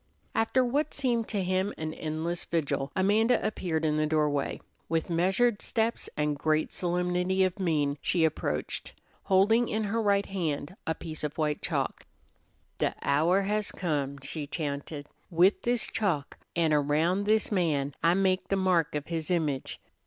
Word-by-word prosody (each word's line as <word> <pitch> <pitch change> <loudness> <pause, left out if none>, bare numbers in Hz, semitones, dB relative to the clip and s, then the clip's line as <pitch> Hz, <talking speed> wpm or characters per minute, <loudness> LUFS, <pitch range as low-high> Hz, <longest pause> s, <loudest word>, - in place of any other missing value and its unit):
After 250 +3 +2
what 290 +5 0
seemed 240 -5 0
to 200 -3 -1
him 185 +2 0
an 155 0 -4
endless 160 +2 -3
vigil, 145 -4 -1
Amanda 215 +5 +3
appeared 165 -7 -1
in 150 -1 +1
the 155 0 +2
doorway. 150 -2 0 0.3
With 165 +1 -1
measured 195 +7 +2
steps 230 0 -1
and 150 -1 +1
great 155 0 +1
solemnity 180 +1 +1
of 185 +1 -1
mien, 150 -6 0
she 170 -3 +2
approached, 155 - -3 0.3
holding 220 +5 +4
in 215 +1 0
her 220 +2 0
right 200 -2 +2
hand 165 -3 -3
a 160 - +1
piece 155 -2 -7
of 150 -1 -3
white 150 -2 0
chalk. - - -2 0.7
"De - - 0
hour 165 +7 +3
has 210 +1 -1
come," 145 -6 -2
she 145 +1 -4
chanted. 145 -1 -4 0.2
"With 180 +4 +4
this 240 -1 +1
chalk, 170 -10 -1 0.2
an' 165 -2 +2
around 155 +7 +2
this 215 +1 +2
man, 150 -8 +1
I 170 +2 +4
make 190 -1 +1
the 195 - +1
mark 180 -5 +2
of 150 -1 -2
his 165 -2 -3
image." 155 -7 -1
175 Hz, 160 wpm, -29 LUFS, 155-200 Hz, 0.7 s, holding